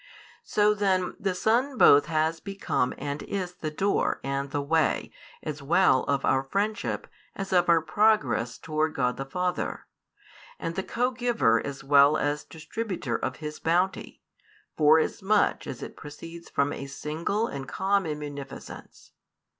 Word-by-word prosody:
So 210 0 +3
then 190 -3 0
the 195 -2 -1
Son 245 +8 +1
both 145 -6 +7
has 160 0 0
become 195 -10 -1
and 145 +1 -4
is 185 -3 -4
the 165 -3 -4
Door 195 +6 0
and 140 0 -2
the 145 0 -2
Way 160 +2 +1 0.3
as 150 -1 -5
well 140 -2 +3
of 140 -1 0
our 130 - +3
friendship 200 +10 -2 0.3
as 195 -1 -4
of 175 -1 +3
our 165 -1 +5
progress 205 - +2
towards 155 0 -1
God 125 -2 0
the 135 - -5
Father, 180 +4 -2 0.7
and 165 - -4
the 190 - -2
Co 245 +6 -1
Giver 240 - +2
as 140 -1 -6
well 140 +2 +6
as 145 0 -1
Distributer 165 - -4
of 130 - -2
His 150 +2 -7
bounty, 180 +4 -1 0.5
forasmuch 160 +7 +3
as - - -6
it - - -8
proceeds 165 +3 -10
from 140 0 0
a 140 - -6
single 160 +10 -2
and 135 - -6
common 190 -1 0
munificence. 145 -2 -9
160 Hz, 145 wpm, -27 LUFS, 140-195 Hz, 0.7 s, both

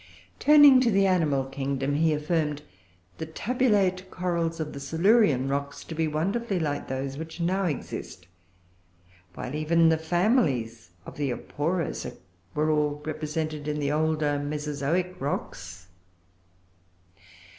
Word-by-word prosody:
] 90 - -30
Turning 290 -3 +8
to 245 - +3
the 195 -2 +3
animal 155 -8 +2
kingdom, 135 +1 -2
he 160 +2 +2
affirmed 150 -1 -1 0.6
the 160 - -3
tabulate 195 -2 +1
corals 170 -3 -2
of 155 -1 -4
the 140 - -7
Silurian 160 - +3
rocks 140 +1 -3
to - - -8
be 160 0 0
wonderfully 195 +7 -1
like 145 -3 -2
those 135 +1 -4
which 160 +2 -8
now 185 +3 0
exist; 140 - -5 1.1
while 125 - -6
even 165 +2 +3
the 160 -1 +2
families 160 - 0 0.2
of - - -10
the 145 -2 -1
Aporosa 160 +6 -3 0.4
were 155 +1 +2
all 150 -1 0
represented 155 -1 -3
in 150 0 -2
the 145 -1 0
older 155 -1 +1
Mesozoic 150 +5 -2
rocks. 90 -10 -5
155 Hz, 130 wpm, -26 LUFS, 145-180 Hz, 1.1 s, Turning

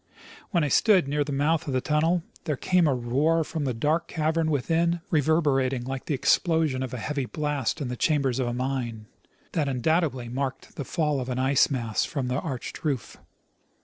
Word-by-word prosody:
While 175 -5 +1
I - - +1
stood 190 - +4
near 145 +1 +1
the 145 - -5
mouth 150 +4 +1
of 140 - -2
the - - +3
tunnel 160 +5 +1 0.2
there 150 -4 -1
came 180 +1 +3
a 135 - +2
roar 140 +7 +1
from 155 -1 -4
the 130 - 0
dark 155 +8 0
cavern 160 0 0
within, 165 +4 +1
reverberating 140 -5 +2
like 135 +1 -5
the 150 - +1
explosion 160 -1 +2
of 130 -2 -3
a 125 - -4
heavy 140 +3 -2
blast 150 -5 -2
in 140 - -2
the 125 - -3
chambers 135 -2 +1
of 130 - 0
a 120 - -2
mine, 125 -4 -3 0.5
that 150 -4 0
undoubtedly 135 -1 0
marked 135 +2 -4
the 140 - -5
fall 150 -3 0
of 125 - -5
an 125 - -2
ice 130 +1 +3
mass 115 -6 -1
from 135 -4 -3
the 125 +2 0
arched 135 -6 -6
roof. 140 -6 -2
140 Hz, 195 wpm, -26 LUFS, 130-160 Hz, 0.5 s, stood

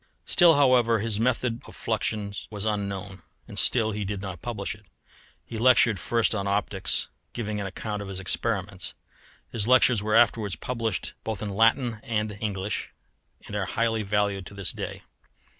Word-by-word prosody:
Still, 175 -3 +6
however, 125 -5 +5
his 110 0 -1
method 120 0 0
of - - -12
fluxions 100 -2 -2
was 105 -1 -4
unknown, 100 -2 -3 0.3
and - - -5
still 110 -3 +2
he 105 0 -3
did 100 0 -3
not 95 -3 -6
publish 110 -5 -3
it. 105 -2 -18 0.6
He 115 - -6
lectured 115 -4 +5
first 115 +7 +1
on 100 -2 -2
optics, 100 0 +1 0.3
giving 105 -3 -3
an 100 - -3
account 105 +2 -4
of 100 - -6
his 95 -1 -4
experiments. 95 -1 -2 0.6
His 110 -1 -1
lectures 125 -3 +5
were 105 +1 0
afterwards 115 -5 +3
published 115 +3 -2
both 110 -2 -3
in 105 - -3
Latin 115 +2 +3
and 105 -2 -2
English, 105 -1 -2 0.6
and - - -7
are - - 0
highly 115 -1 0
valued 100 -2 0
to 100 - -11
this 100 -4 -2
day. - - -6
105 Hz, 165 wpm, -26 LUFS, 100-115 Hz, 0.6 s, Still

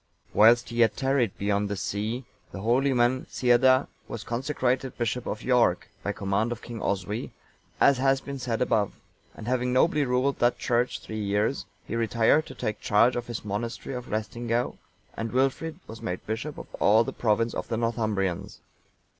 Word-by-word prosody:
Whilst 115 +3 +6
he 115 - -6
yet 115 -3 +3
tarried 135 -6 +1
beyond 100 0 0
the 100 - -2
sea, 110 +6 -3 0.3
the 95 - -7
holy 125 +6 +2
man, 125 +1 +2
Ceadda,(908) 130 +2 +4 0.2
was 115 - -6
consecrated 130 +1 -1
bishop 120 +1 -2
of - - -3
York(909) 125 -8 +3 0.2
by 100 - -1
command 100 +3 -1
of 120 - -5
King 115 -3 -7
Oswy, 100 +3 -2 0.5
as 140 -2 +5
has 135 0 +3
been 140 0 -7
said 120 -1 0
above; 110 -5 +1 0.4
and 110 - -9
having 125 0 0
nobly 145 +3 +3
ruled 130 +1 +1
that 120 0 +3
church 120 +1 0
three 110 -1 -5
years, 105 +6 0 0.2
he - - -4
retired 115 +6 +2
to - - -9
take 105 - -3
charge 115 +4 +4
of 120 -1 -3
his 120 -2 -5
monastery 115 +6 -4
of 125 -1 -6
Laestingaeu, 115 +2 -2 0.4
and 115 -1 -4
Wilfrid 135 +6 0
was 110 0 -10
made 90 0 -4
bishop 115 +8 -4
of - - -7
all 110 +3 +5
the - - -5
province 115 0 +1
of - - -4
the 115 - -2
Northumbrians. 110 -6 -1
120 Hz, 175 wpm, -27 LUFS, 110-125 Hz, 0.5 s, Whilst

